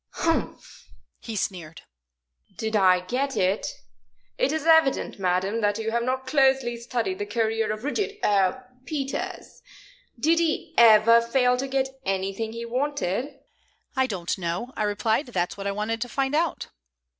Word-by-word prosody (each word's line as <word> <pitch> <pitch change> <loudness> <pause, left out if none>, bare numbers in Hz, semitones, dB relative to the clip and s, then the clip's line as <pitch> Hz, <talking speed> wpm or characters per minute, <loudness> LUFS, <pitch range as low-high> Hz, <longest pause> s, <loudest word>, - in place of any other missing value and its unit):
"Humph!" 330 0 -3 0.3
he 225 - -7
sneered. 175 -5 -4 0.7
"Did 220 0 -2
I 185 -3 +5
get 265 +8 -2
it? 190 +3 +1 0.7
It - - +2
is 315 -1 -2
evident, 320 -9 +3
madam, 190 +4 0
that 205 -1 +1
you 225 0 -3
have 235 +1 0
not 260 +2 -2
closely 265 -3 +2
studied 235 -5 -3
the 205 - -2
career 225 0 0
of 215 +1 -5
Rudyard 410 +8 -2
er 205 +5 +1 0.2
Peters. 275 0 -5 0.6
Did 330 +6 +3
he 330 -2 -1
ever 230 0 +7
fail 250 +1 +2
to 265 +2 -3
get 265 0 0
anything 195 +3 -2
he 230 0 -5
wanted?" 270 0 -2 0.5
"I 260 0 +2
don't 185 -5 -3
know," 180 +9 -3
I 215 - 0
replied. 220 +6 0
"That's 180 -7 -2
what 200 0 -5
I - - 0
wanted 210 +3 -3
to 245 - -3
find 270 +1 -1
out." 325 +2 0
230 Hz, 155 wpm, -25 LUFS, 205-265 Hz, 0.7 s, ever